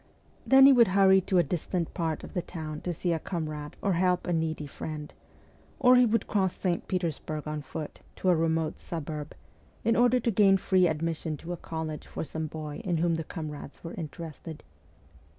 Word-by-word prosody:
Then 270 0 +8
he 275 - +9
would 240 -2 +6
hurry 190 -1 +6
to 185 0 0
a 175 - +6
distant 170 +1 -2
part 160 -4 -2
of - - -9
the 180 - 0
town 155 -3 -6
to 180 - -2
see 175 +1 -1
a 165 - -1
comrade 155 -4 -5
or 200 - +2
to 175 - +1
help 180 -1 +2
a 175 - 0
needy 160 -2 -1
friend; 150 +1 -7 0.7
or 255 -2 +6
he 250 -1 +6
would 230 +1 +1
cross 190 -3 0
St. 175 -3 -2
Petersburg 160 -4 -3
on 150 0 -3
foot, 145 +2 -7 0.2
to 185 - 0
a 180 - +5
remote 160 -1 0
suburb, 155 -2 -6 0.5
in 230 +1 +3
order 245 +1 +4
to 235 0 0
obtain 195 -2 +5
free 185 -1 +3
admission 160 -1 -2
to 175 +4 -6
a - - -2
college 160 -2 -5
for - - -5
some 160 0 -4
boy 150 -1 -6
in 180 -5 0
whom 170 +1 +2
the 165 0 -1
comrades 150 -4 -7
were 165 - -6
interested. 160 -1 -7
165 Hz, 200 wpm, -28 LUFS, 155-185 Hz, 0.7 s, he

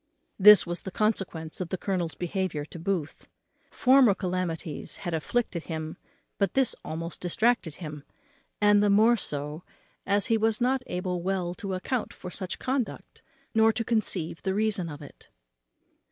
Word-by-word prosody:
This 210 -1 +9
was 175 0 -4
the - - -6
consequence 185 -6 -1
of 175 - -4
the 185 - -2
colonel's 180 -4 -2
behaviour 175 -4 -2
to 165 - -10
Booth. 170 -4 -3 0.4
Former 255 -5 +5
calamities 180 -5 -3
had 175 - -2
afflicted 170 +1 -1
him, 160 -1 -5 0.4
but 200 - 0
this 265 -3 +3
almost 165 +2 -5
distracted 180 -2 +1
him; 150 -4 -8 0.6
and 205 0 +5
the 205 - +3
more 220 +4 +5
so 150 -5 -3 0.5
as 200 0 +4
he 225 -1 +2
was 220 0 +1
not 255 +2 +1
able 180 0 -3
well 180 -1 -1
to 190 +1 -4
account 230 +6 -3
for 180 - -8
such 185 0 -4
conduct, 260 -2 -3 0.3
nor 225 0 +5
to 230 0 -3
conceive 195 -8 -1
the 190 -1 -1
reason 205 -5 0
of 145 -1 -8
it. 145 - -14
185 Hz, 155 wpm, -27 LUFS, 165-215 Hz, 0.6 s, This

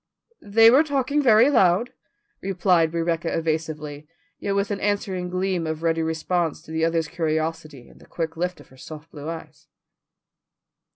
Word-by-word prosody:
"They 225 +2 +6
were 270 +4 +6
talking 285 -1 0
very 235 -2 +6
loud," 195 -1 +3 0.5
replied 180 -4 +2
Rebecca 165 0 -1
evasively, 155 -2 -3 0.3
yet 200 -1 -2
with 200 +1 0
an 200 - -2
answering 195 -3 -2
gleam 185 -2 -1
of 160 0 -4
ready 165 0 +1
response 160 0 -1
to - - -12
the 160 0 -1
other's 165 -1 +1
curiosity 155 -4 -3
in - - -19
the - - -18
quick 160 -1 -4
lift 180 +2 -3
of - - -16
her 130 - -19
soft 155 +3 -11
blue 150 +1 -7
eyes. 165 -1 -9
165 Hz, 160 wpm, -23 LUFS, 160-195 Hz, 0.5 s, They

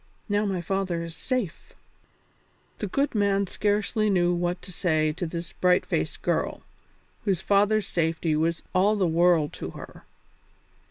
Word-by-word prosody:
Now 205 0 +1
my 190 -3 -1
father 185 -2 -1
is 165 -1 -7
safe!" 250 -8 -3 1.1
The 210 - -2
good 275 +9 0
man 200 -2 +2
scarcely 210 +2 0
knew 175 -2 +3
what 175 +1 -1
to 185 - -10
say 155 -3 +1
to 175 +3 -4
this 170 +1 -6
bright 180 0 +3
faced - - -2
girl, - - -1 0.6
whose 190 -4 0
father's 205 +1 +3
safety 160 -1 0
was 165 +2 0
all 195 +3 +4
the 200 -3 +1
world 170 -2 +3
to - - -6
her. - - -11
180 Hz, 150 wpm, -26 LUFS, 170-205 Hz, 1.1 s, all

